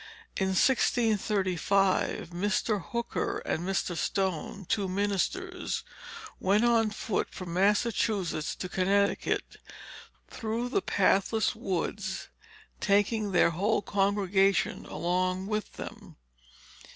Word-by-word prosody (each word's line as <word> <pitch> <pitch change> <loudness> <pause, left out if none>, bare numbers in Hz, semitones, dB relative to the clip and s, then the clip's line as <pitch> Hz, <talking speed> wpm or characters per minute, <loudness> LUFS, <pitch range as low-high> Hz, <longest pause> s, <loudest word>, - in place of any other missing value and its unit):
In 190 - 0
1635, 195 - +2
Mr. 205 +3 0
Hooker 235 0 -2
and 160 - -1
Mr. 190 -1 -1
Stone, 190 +2 -2
two 200 -3 0
ministers, 205 - -1 0.6
went 205 +5 +3
on 230 -2 +3
foot 215 0 -2
from 180 -2 -7
Massachusetts 200 -3 +1
to 185 - -5
Connecticut, 195 +2 0 0.7
through 230 +2 -3
the 385 - +1
pathless 200 - +2
woods, 190 -2 -3 0.5
taking 205 +1 +2
their 175 -2 +4
whole 205 +5 +1
congregation 195 -1 +1
along 185 +2 -1
with 210 +1 -3
them. - - -9
200 Hz, 95 wpm, -29 LUFS, 185-215 Hz, 0.7 s, their